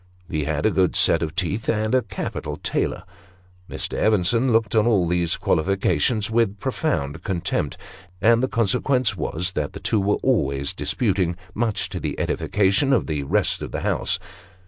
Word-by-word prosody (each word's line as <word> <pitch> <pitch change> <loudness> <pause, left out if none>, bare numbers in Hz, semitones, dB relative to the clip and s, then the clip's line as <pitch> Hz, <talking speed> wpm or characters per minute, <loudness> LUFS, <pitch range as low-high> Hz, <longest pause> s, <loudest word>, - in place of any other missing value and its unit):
He 80 -5 -2
had 75 -1 -1
a 110 - +4
good 95 -2 +2
set 80 - +4
of 80 -2 -3
teeth, 100 +3 -1
and 110 0 0
a 130 - +4
capital 105 -3 -5
tailor. - - -2 0.7
Mr. - - -4
Evenson 110 +4 +3
looked 115 0 +2
on 110 +1 +4
all 100 -7 +3
these 85 -1 +1
qualifications 95 +5 +1
with 110 -3 +1
profound 85 - -2
contempt; 90 -3 -2 0.4
and 115 +3 +4
the 130 - +1
consequence 125 +2 +1
was 90 +3 -3
that 75 -5 -3
the - - -7
two 110 - 0
were 100 +1 +1
always 70 - +1
disputing, 95 -7 0 0.2
much 110 -1 -1
to - - -5
the - - -4
edification 105 +7 +1
of 125 - +2
the 75 -3 -2
rest 70 - 0
of - - -5
the - - -3
house. - - 0
100 Hz, 170 wpm, -23 LUFS, 85-115 Hz, 0.7 s, a